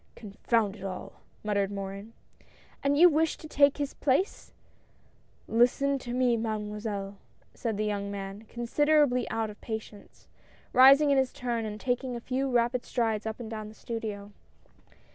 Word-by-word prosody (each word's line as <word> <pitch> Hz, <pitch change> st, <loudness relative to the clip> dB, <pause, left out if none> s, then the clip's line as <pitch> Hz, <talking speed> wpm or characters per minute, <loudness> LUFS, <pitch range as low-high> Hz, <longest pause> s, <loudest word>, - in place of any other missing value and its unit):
" -, -, -37 dB
Confound 215 Hz, 0 st, -1 dB
it 205 Hz, -, -12 dB
all," 190 Hz, -2 st, -7 dB, 0.2 s
muttered 200 Hz, -2 st, 0 dB
Morin. 200 Hz, +2 st, -6 dB, 0.3 s
" -, -, -28 dB
And 280 Hz, +1 st, +2 dB
you 350 Hz, +3 st, +9 dB
wish 320 Hz, -1 st, +1 dB
to 310 Hz, -, -10 dB
take 280 Hz, -2 st, +4 dB
his 285 Hz, -1 st, -3 dB
place? 290 Hz, +8 st, 0 dB, 0.3 s
" -, -, -35 dB
" 230 Hz, -, -4 dB
Listen 275 Hz, +3 st, +3 dB
to 245 Hz, -2 st, -7 dB
me. 250 Hz, -1 st, +2 dB
Mademoiselle," 210 Hz, -2 st, -4 dB, 0.3 s
said 225 Hz, -4 st, -3 dB
the 215 Hz, -, 0 dB
young 200 Hz, -1 st, -2 dB
man, 200 Hz, +1 st, -6 dB
considerably 265 Hz, +1 st, +2 dB
out 220 Hz, -1 st, -2 dB
of 210 Hz, -, -16 dB
patience, 220 Hz, -2 st, -8 dB, 0.5 s
rising 275 Hz, +3 st, +7 dB
in 275 Hz, -, +4 dB
his 265 Hz, -1 st, +1 dB
turn 235 Hz, -2 st, -3 dB
and 210 Hz, 0 st, -5 dB
taking 250 Hz, 0 st, -2 dB
a -, -, -4 dB
few 265 Hz, +3 st, -2 dB
rapid 245 Hz, 0 st, +1 dB
strides 225 Hz, -3 st, -1 dB
up 220 Hz, +1 st, -5 dB
and 230 Hz, -2 st, -7 dB
down 215 Hz, -1 st, -5 dB
the 215 Hz, -, -14 dB
studio. 215 Hz, -4 st, -6 dB
230 Hz, 170 wpm, -28 LUFS, 210-260 Hz, 0.5 s, you